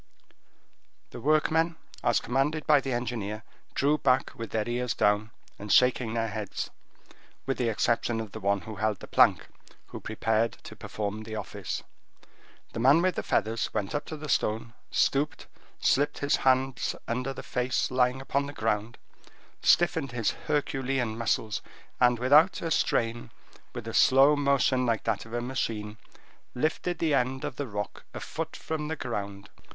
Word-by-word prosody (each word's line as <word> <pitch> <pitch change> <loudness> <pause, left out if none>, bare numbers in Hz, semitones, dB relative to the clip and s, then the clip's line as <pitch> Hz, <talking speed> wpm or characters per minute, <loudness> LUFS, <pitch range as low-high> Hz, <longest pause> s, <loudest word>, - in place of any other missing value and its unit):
The - - -8
workmen, 155 +4 +2 0.3
as - - +3
commanded 140 +5 0
by 150 -2 +5
the 135 - -3
engineer, 115 -3 -3 0.3
drew 150 +2 +2
back 130 -1 +2
with 115 -3 -6
their 110 0 -1
ears 120 0 -1
down, 105 +1 +2 0.3
and 105 0 -5
shaking 125 -1 +4
their 115 -1 0
heads, 105 -2 -4 0.7
with 135 0 -2
the 120 -2 +1
exception 115 +1 +1
of 110 -2 -5
the 110 - -7
one 100 -1 +1
who 110 +3 -8
held 105 -1 0
the - - -9
plank, - - +4 0.4
who - - -7
prepared 110 +1 0
to - - -10
perform 105 0 -4
the 110 0 -7
office. - - -5 0.9
The - - -4
man 140 +8 +5
with 185 0 +2
the - - -2
feathers 110 +1 0
went 100 - -1
up 145 - -2
to 155 - -6
the 150 +1 -7
stone, 115 -3 0 0.2
stooped, 145 +2 +1 0.3
slipped 145 +2 +2
his 145 0 +1
hands 130 -1 +1
under 125 +3 -2
the 135 - -7
face 125 +1 -1
lying 130 0 +2
upon 140 +1 -1
the 145 - -7
ground, 110 -1 -1 0.6
stiffened 160 -6 +3
his 115 -3 +1
Herculean 135 -5 -1
muscles, 110 -1 -1 0.4
and 125 -1 +4
without 145 +9 +5
a 165 - -2
strain, 115 -4 0 0.4
with - - -7
a - - -4
slow 135 +3 +6
motion, 140 -2 +2
like 115 -3 0
that 110 0 -1
of 110 - -12
a 120 - -1
machine, 110 -4 -3 0.6
lifted 160 +6 -1
the 160 -2 +1
end 130 0 +1
of 125 - -5
the 145 - -3
rock 105 -2 -5
a - - -4
foot - - -5
from 155 -1 -4
the 160 - -2
ground. 100 -7 -5
125 Hz, 165 wpm, -28 LUFS, 110-140 Hz, 0.9 s, slow